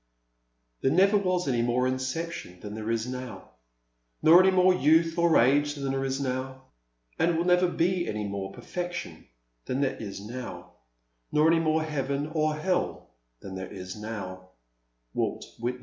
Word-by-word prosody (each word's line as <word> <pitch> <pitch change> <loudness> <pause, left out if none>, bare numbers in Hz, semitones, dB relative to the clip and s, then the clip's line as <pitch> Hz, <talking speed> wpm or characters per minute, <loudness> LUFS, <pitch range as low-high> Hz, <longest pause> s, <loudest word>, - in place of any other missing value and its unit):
'* - - -48
There - - +3
was 155 - +1 0.5
never - - -1
any 120 - +2
more 120 +1 +1
inception 130 - -4
than 105 -1 -7
there 110 +1 -5
is 115 -1 0
now, 125 -6 -7 0.7
Nor 170 +3 +8
any 190 - +5
more 185 0 +5
youth 165 0 +3
or 170 -2 +4
age 145 +4 +3
than 140 -2 -2
there 135 0 -1
is 135 0 -1
now; 130 0 -3 0.6
And 170 0 +2
will 170 - 0
never 180 0 +4
be 175 +1 0
any 105 0 -3
more 100 -1 -4
perfection 175 - -6 0.4
than 130 +2 -1
there 135 -1 0
is 100 -3 -6
now, 120 +5 -8 0.6
Nor 155 +2 +4
any 165 - +4
more 160 -1 +1
heaven 145 -1 -2
or 155 -1 +1
hell 180 - -2 0.3
than 95 - -8
there 95 -1 -6
is 95 -1 -7
how/' 100 -4 -7 0.7
Wai^t - - -1 0.2
Whitman. 125 +2 -2
135 Hz, 165 wpm, -27 LUFS, 110-160 Hz, 0.7 s, Nor